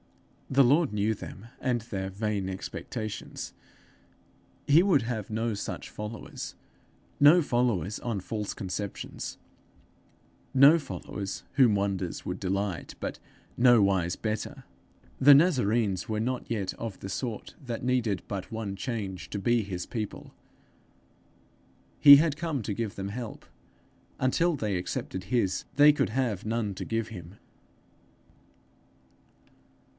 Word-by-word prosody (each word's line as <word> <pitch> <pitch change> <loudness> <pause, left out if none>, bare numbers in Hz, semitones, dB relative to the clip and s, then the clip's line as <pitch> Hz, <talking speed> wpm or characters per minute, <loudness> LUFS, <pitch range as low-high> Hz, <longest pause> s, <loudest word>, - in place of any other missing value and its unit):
The 135 +1 +5
Lord 145 +4 +4
knew 105 +1 +1
them, 100 0 -9 0.2
and 125 -2 +1
their 95 -4 -4
vain 100 -1 -2
expectations. 105 +3 -6 1.1
He 155 +5 +6
would 170 -11 +3
have 115 -4 -4
no 110 +1 -1
such 100 - -5
followers 105 +1 -7 0.7
no 155 +5 +8
followers 120 - 0
on 115 -5 -2
false 105 +2 -4
conceptions 95 +1 -5 1.2
no 140 +5 +8
followers 100 -8 -6
whom 125 -7 +5
wonders 100 -3 -2
would 90 +1 -4
delight 95 -1 -2
but - - -4 0.4
nowise 100 -8 +4
better! 110 -1 -4 0.5
The 140 +1 +9
Nazarenes 120 - +2
were 110 -1 -1
not 125 +3 -2
yet 105 -5 -2
of 115 -4 -6
the - - -6
sort 115 +2 -4
that 120 -3 -5
needed 120 -6 0
but 100 -2 -5
one 110 -3 -4
change 95 - -4
to 100 - -3
be 120 +3 +2
his 95 -4 -5
people. 110 -4 -6 1.7
He 140 -1 +11
had 150 0 +3
come 155 -6 -2
to 105 - -2
give 110 0 -3
them 100 0 -4
help; 115 +1 -6 0.7
until 165 +6 +2
they 105 -7 -1
accepted 90 +1 -4
his, 100 -3 0
they 145 +1 +8
could - - 0
have 115 -5 -1
none 110 -2 -1
to - - -6
give 115 -1 -2
him. 90 -3 -9
110 Hz, 125 wpm, -28 LUFS, 100-125 Hz, 1.7 s, He